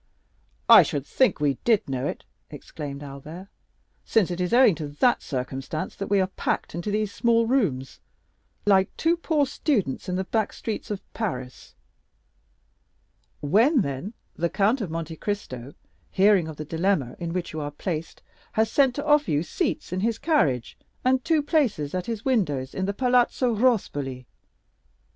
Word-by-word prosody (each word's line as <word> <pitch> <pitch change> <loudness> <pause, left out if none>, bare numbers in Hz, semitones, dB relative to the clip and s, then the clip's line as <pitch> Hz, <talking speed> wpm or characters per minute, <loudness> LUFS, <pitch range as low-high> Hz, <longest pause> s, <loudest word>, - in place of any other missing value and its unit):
"I - - +10
should 140 -2 -2
think 255 - +2
we 145 -3 0
did 225 -4 +2
know 130 -2 -2
it," - - -5 0.3
exclaimed 145 -2 -8
Albert, 150 +7 -9 0.5
"since 205 -6 +2
it 175 +1 -3
is 180 - -1
owing 245 -3 +6
to 150 - -3
that 145 - +2
circumstance 135 +3 -4
that 195 - -4
we 200 -1 +3
are 190 - +3
packed 185 - -3
into 170 +5 -4
these 210 -1 -1
small 230 -1 +2
rooms, 190 - 0 0.7
like 195 -2 +4
two 330 +1 +2
poor 320 -4 +1
students 205 - -1
in 180 - -1
the 190 - -1
back 220 +2 -1
streets 220 -2 -5
of 205 -2 -4
Paris." 130 - -5 1.7
"When, 225 - +4
then, 140 - -4 0.2
the 170 +1 -1
Count 210 +7 +1
of 195 - -3
Monte 165 0 -5
Cristo, 140 - -5 0.3
hearing 195 -3 +4
of 160 - -7
the 155 - -5
dilemma 160 -5 0
in 170 -1 -4
which 175 -1 -3
you 155 - -4
are 145 - -3
placed, 160 +2 -5 0.3
has 220 0 +1
sent 270 -3 +3
to 285 - -4
offer 295 0 +3
you 150 +1 +1
seats 175 - -2
in 185 - -1
his 225 +3 0
carriage 145 - 0 0.3
and 255 0 +3
two 320 -3 +2
places 245 - 0
at 180 -1 -3
his 225 -2 -4
windows 145 - 0
in 190 - -2
the 200 - -1
Palazzo 250 0 +2
Rospoli." 145 - 0
190 Hz, 165 wpm, -25 LUFS, 150-230 Hz, 1.7 s, I